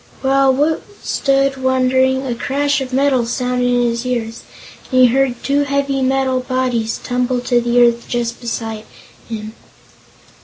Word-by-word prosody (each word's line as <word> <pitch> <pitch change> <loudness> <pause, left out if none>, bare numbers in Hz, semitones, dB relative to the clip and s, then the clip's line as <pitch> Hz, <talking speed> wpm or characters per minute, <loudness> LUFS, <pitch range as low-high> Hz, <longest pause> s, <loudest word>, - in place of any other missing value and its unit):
While 270 0 +3
Woot 305 +4 +1 0.2
stood, 275 0 +1
wondering, 260 +1 +2
a 250 - -2
crash 280 +4 -1
of 260 -1 -5
metal 265 -1 +2
sounded 250 0 -1
in 245 0 +2
his 235 +1 -4
ears 235 -3 -3 0.5
and 255 0 +4
he - - +8
heard 265 -3 0
two 280 +1 +1
heavy 280 -1 -1
bodies 255 -3 0
tumble 250 0 -1
to 245 -1 +1
the 240 +1 +1
earth 235 0 0
just 235 0 -3
beside 225 -2 -5 0.4
him. 215 -1 -6
255 Hz, 145 wpm, -17 LUFS, 240-270 Hz, 0.5 s, he